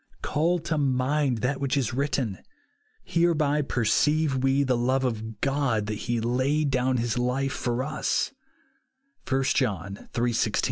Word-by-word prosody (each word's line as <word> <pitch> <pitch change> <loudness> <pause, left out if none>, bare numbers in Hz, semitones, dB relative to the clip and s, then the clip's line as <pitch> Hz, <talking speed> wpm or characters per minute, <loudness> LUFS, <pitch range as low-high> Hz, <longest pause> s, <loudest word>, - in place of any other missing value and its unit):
Call 165 +5 +1
to 155 -2 -2
mind 130 -2 +1
that 135 +2 0
which 140 0 0
is 125 -5 0
written, 130 -6 -1 0.2
— - - -42
*' 440 0 -40
Hereby 155 -4 +2
perceive 145 +3 +1
we 135 +2 +2
the 130 -2 +1
love 130 +3 +1
of 110 -3 -3
God, 135 -6 +1
that 105 - -3 0.2
he 120 -1 +1
laid 130 +6 +1
down 130 0 +1
his 120 +1 -1
life 135 +2 0
for 120 +1 -1
us," 150 - -1 1.0
(1 135 0 +2
John 100 - -2
iii, 120 +1 +2
IG). 115 -2 0
130 Hz, 155 wpm, -26 LUFS, 120-145 Hz, 1.0 s, Hereby